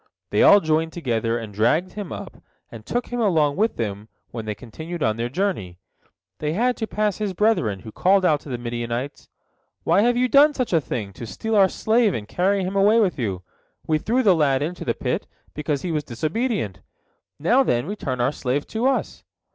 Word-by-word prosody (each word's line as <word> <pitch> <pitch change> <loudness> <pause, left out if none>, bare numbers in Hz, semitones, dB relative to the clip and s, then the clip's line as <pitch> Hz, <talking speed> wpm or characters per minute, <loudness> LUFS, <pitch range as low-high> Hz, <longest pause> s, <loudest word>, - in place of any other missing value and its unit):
They - - +2
all 205 - +8
joined 160 +1 0
together 115 -7 -1
and 110 -3 -7
dragged 155 - +1
him 205 -3 -6
up, - - -7 0.3
and 115 -2 -10
took 245 +1 -2
him 245 - -3
along 160 -10 +2
with 220 +3 0
them 105 -1 -4 0.2
when 115 -2 -6
they 105 -1 -3
continued 160 +9 -7
on 110 -1 +1
their 115 +1 -3
journey. 130 - -2 0.6
They 150 0 -1
had 245 +6 +1
to 220 - -3
pass 210 -2 -1
his 205 -3 -2
brethren, 150 - +1
who 110 - -9
called 190 - +3
out 150 -4 +3
to 145 - -12
the 125 - -3
Midianites: 120 +3 -4 0.5
"Why 200 - +3
have 240 +2 +2
you 250 +1 +3
done 285 +4 +5
such 250 -7 -2
a 165 - +4
thing, 110 -7 -4
to 115 +4 -8
steal 220 - -3
our 195 -2 +6
slave 220 -2 +2
and 105 -2 -5
carry 190 - +1
him 185 +2 -3
away 205 +3 +5
with 190 -9 +1
you? 95 -6 -2 0.4
We 155 -1 +1
threw 245 +9 +1
the 200 -5 +6
lad 145 -4 +2
into 175 +4 -4
the - - -1
pit, - - -2 0.3
because 150 -1 -2
he 180 - -2
was 150 -2 -1
disobedient. 155 - -2 0.6
Now, 235 - +3
then, 120 - +1
return 145 -10 -4
our 120 +3 +2
slave 140 0 -2
to 230 +3 0
us." 270 - -1
160 Hz, 205 wpm, -23 LUFS, -, 0.6 s, all